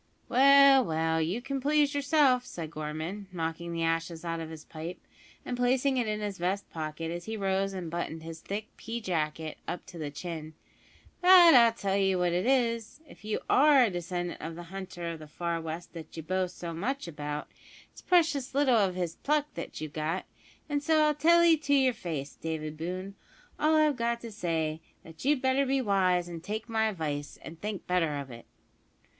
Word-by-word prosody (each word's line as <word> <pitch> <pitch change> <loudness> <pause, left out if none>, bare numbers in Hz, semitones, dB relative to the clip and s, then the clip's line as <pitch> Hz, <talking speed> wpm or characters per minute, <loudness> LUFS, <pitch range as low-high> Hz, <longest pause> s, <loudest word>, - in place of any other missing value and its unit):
"Well, 275 +1 +7
well, 160 -2 0
you 185 +10 -2
can 275 0 -3
please 295 +1 +2
yourself," 285 -3 +3
said 165 -9 -7
Gorman, 160 +6 -5
knocking 170 0 -4
the 165 0 -2
ashes 165 0 -1
out 165 0 -2
of 160 -1 -6
his 160 -1 -10
pipe, 165 +3 -7 0.5
and 250 - -3
placing 255 +2 +2
it 240 -3 0
in 215 0 -2
his 205 -3 -4
vest 190 +3 -1
pocket 160 0 -4
as 175 0 -5
he 220 0 -4
rose 195 0 0
and 180 -4 -5
buttoned 165 -1 -4
his 165 0 -8
thick 205 +2 -4
pea 230 +1 -5
jacket 160 -5 -3
up 175 - -4
to 170 - -11
the 150 -2 -3
chin; 155 0 -7 0.7
"but 360 -2 +9
I'll 235 -3 +7
tell 200 -3 -1
you 195 -1 +2
what 180 -1 +1
it 180 +6 0
is, 235 -2 +1
if - - -16
you 215 0 -2
are 285 -2 +6
a 235 - +2
descendant 175 0 -4
of 165 +1 -5
the 175 - -8
hunter 185 -3 -6
of 165 - -7
the 155 - -10
far 170 +2 -3
west 165 +2 -6
that 165 -1 -10
you 160 - -5
boast 185 +2 -2
so 170 -1 -5
much 250 +9 -3
about, 150 -2 -5 0.4
it's - - -14
precious 310 -8 +2
little 270 -4 +4
of 195 -4 +2
his 175 -2 -3
pluck 295 0 0
that - - -7
you've 155 -2 -6
got; 160 +4 -2 0.4
an' 290 -2 -1
so 310 0 +3
I - - -1
tell 335 +4 +5
'ee 335 -2 +6
to 285 -1 +1
your 265 -2 +4
face, 155 -9 -5
David 155 -1 -4
Boone. 185 +5 -5 0.5
All 310 +1 +3
I've 305 -3 +3
got 235 0 0
to 230 - -7
say 165 -6 -1
is, 155 - -12 0.3
that 160 - -11
you'd 280 -2 +2
better 260 +1 +3
be 270 0 +1
wise 185 -6 +2
and 170 -2 -8
take 215 +4 -4
my 220 -1 +1
advice, 150 -7 -4
and 165 0 -10
think 210 -2 -4
better 170 -5 +1
of 140 -2 -6
it." 115 0 -11
185 Hz, 205 wpm, -29 LUFS, 165-255 Hz, 0.7 s, but